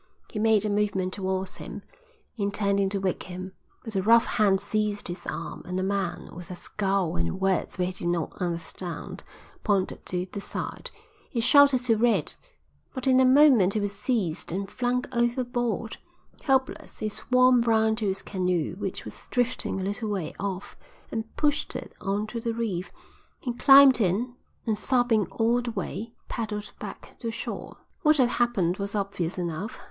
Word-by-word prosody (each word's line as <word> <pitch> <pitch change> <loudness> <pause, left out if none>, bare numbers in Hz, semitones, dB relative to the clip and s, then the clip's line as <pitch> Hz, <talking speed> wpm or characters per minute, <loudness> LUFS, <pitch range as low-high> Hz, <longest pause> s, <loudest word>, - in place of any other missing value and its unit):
He 210 - -4
made 220 -1 +3
a - - 0
movement 200 -3 0
towards 190 -1 -2
him, - - -8 0.5
intending 200 -2 +1
to 200 - -1
wake 190 -1 -1
him, 185 +1 -6 0.3
but 220 -2 -6
a 190 - +2
rough 230 +4 +6
hand 195 -3 +3
seized 205 0 -1
his 175 - -6
arm, - - -5
and 180 +1 -3
a - - 0
man, 190 -3 -2
with 175 +2 -9
a 180 - -5
scowl 195 -1 -1
and 85 - -1
words 195 -2 0
which 180 0 -1
he - - -5
did - - +1
not 170 -3 -1
understand, 175 0 -4 0.4
pointed 195 -3 0
to 180 0 -1
the 200 - -5
side. - - -5 0.4
He 240 - -2
shouted 275 +1 +6
to 230 -3 +3
Red, 215 -8 +2 0.6
but 260 - -4
in 260 -1 +5
a 260 - +6
moment 255 -8 +6
he - - +2
was 205 -1 -1
seized 200 -7 -1
and 195 +3 -2
flung 250 0 0
overboard. 240 -2 -1 0.4
Helpless, 265 -2 0
he 215 - -2
swam 255 +3 +4
round 220 -1 +3
to 215 - 0
his 195 0 -2
canoe 180 -5 -1
which 195 -2 -4
was - - -11
drifting 245 -5 0
a - - -3
little 205 +3 -2
way 190 -6 -2
off, 195 -1 -4 0.4
and 225 0 -4
pushed 295 -1 +1
it - - -6
on 200 +2 -1
to 230 +2 -5
the 230 0 -2
reef. 200 -6 -2 0.5
He 245 - -3
climbed 270 0 +8
in 215 +6 +1 0.3
and, 220 -3 +1
sobbing 240 -2 +2
all 235 +2 +1
the 240 - -4
way, 230 0 -5
paddled 210 -3 -4
back - - -9
to 230 - -3
shore." 225 - -6 0.2
"What 305 -3 +5
had 250 -3 +4
happened 195 -7 +2
was 200 +1 -4
obvious 195 -4 -2
enough. 180 +7 -4
210 Hz, 175 wpm, -27 LUFS, 190-240 Hz, 0.6 s, climbed